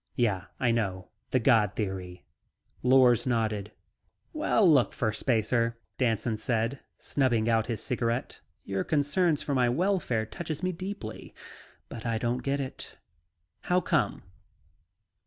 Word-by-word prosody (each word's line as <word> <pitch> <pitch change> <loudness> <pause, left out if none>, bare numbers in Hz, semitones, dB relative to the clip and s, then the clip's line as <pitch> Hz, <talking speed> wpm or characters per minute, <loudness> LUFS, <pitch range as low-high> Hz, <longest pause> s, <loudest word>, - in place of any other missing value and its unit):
"Yeah, 100 -6 +1
I 120 -2 +2
know. 95 -5 -2 0.2
The - - +2
"god" 110 -5 +3
theory." 90 -6 -4 0.6
Lors 125 -1 +5
nodded. 110 -4 0 0.6
"Well, 265 - +3
look, 140 -7 +4
Firstspacer," 115 +1 +1 0.2
Danson 115 -2 +1
said, 115 +4 -1 0.2
snubbing 120 -5 +1
out 115 -1 +2
his 115 -3 -3
cigarette. 120 0 -2 0.2
"Your 95 -1 -2
concern 155 +3 +2
for 145 0 -3
my 125 -2 +3
welfare 145 - +1
touches 155 - -6
me 185 - +1
deeply, 180 - -7 0.5
but 115 - -8
I 115 -2 0
don't 120 +2 -1
get 140 +2 -1
it. 135 -2 -6 0.7
How 180 0 +3
come?" 180 - 0
120 Hz, 125 wpm, -28 LUFS, 110-140 Hz, 0.7 s, Lors